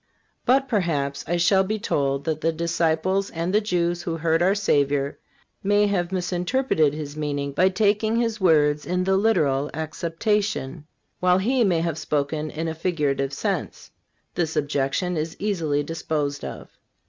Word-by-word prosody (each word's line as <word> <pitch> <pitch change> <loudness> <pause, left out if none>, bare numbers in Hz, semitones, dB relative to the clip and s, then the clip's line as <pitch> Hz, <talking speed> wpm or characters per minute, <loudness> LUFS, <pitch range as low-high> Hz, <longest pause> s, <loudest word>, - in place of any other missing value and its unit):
But, 270 +2 +4
perhaps, 160 - -1
I 175 +2 0
shall 190 +3 +4
be 215 +3 -2
told 140 -8 -1
that 155 0 -2
the 165 - +2
disciples 170 +3 0
and 170 +3 -3
the 210 - +4
Jews 175 -4 0
who 165 -1 -3
heard 165 +1 +1
our 190 +3 +3
Savior 145 -8 +1 0.4
may 205 +1 +3
have 185 -3 0
misinterpreted 180 - +1
His 150 -1 -6
meaning 145 -2 -2
by 185 +7 +3
taking 210 +3 +1
His 230 -2 0
words 150 -4 +3
in 180 +1 0
the 190 +1 +2
literal 150 -10 +2
acceptation, 165 -1 -2 0.3
while 180 0 +4
He 240 +6 +2
may 175 -6 +2
have 165 -2 -2
spoken 150 +1 -1
in 160 +2 -4
a 160 - -2
figurative 150 -5 -1
sense. 140 - -3 0.4
This 165 -2 -1
objection 145 +4 0
is 155 +1 -3
easily 165 -8 0
disposed 145 -2 -3
of. - - -7
165 Hz, 155 wpm, -24 LUFS, 150-190 Hz, 0.4 s, But